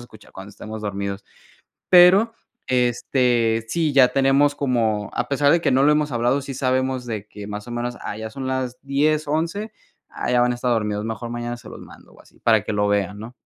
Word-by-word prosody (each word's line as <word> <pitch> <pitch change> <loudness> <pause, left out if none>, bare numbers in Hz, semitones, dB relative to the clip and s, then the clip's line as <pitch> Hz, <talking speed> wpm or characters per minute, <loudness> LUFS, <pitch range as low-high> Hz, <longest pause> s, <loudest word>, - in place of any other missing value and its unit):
escuchar 110 -3 -16
cuando 95 +1 -10
estemos 110 +1 -9
dormidos. 100 -1 -4 0.7
Pero, 185 +5 +7 0.4
este, 120 -2 +1
sí, 160 +3 0
ya 135 -3 +5
tenemos 135 +1 +3
como, 115 -7 -1
a 120 - -1
pesar 140 +1 +3
de 170 0 +3
que - - +1
no 130 +1 +3
lo 150 - +5
hemos 150 -1 +1
hablado, 120 +4 +1
sí 140 - -6
sabemos 130 -1 -1
de 110 -3 -4
que 105 -1 -10
más 105 +2 -7
o - - -7
menos, 120 0 -4
ah, 105 - -5
ya 110 0 -6
son 135 +3 -7
las 130 -1 -3
10, 150 +3 +1
11 165 +8 -2 0.4
ah, - - -5
ya 125 - +3
van 125 0 +3
a 120 - -2
estar 125 +1 -2
dormidos, 105 -2 -1
mejor 115 +1 -5
mañana 120 0 -4
se 120 - -14
los - - -10
mando - - -15
o - - -18
así, - - -24
para 110 -3 +3
que - - -4
lo 105 0 +1
vean, 100 0 0
¿no? 115 +3 -9
125 Hz, 220 wpm, -22 LUFS, 110-140 Hz, 0.7 s, Pero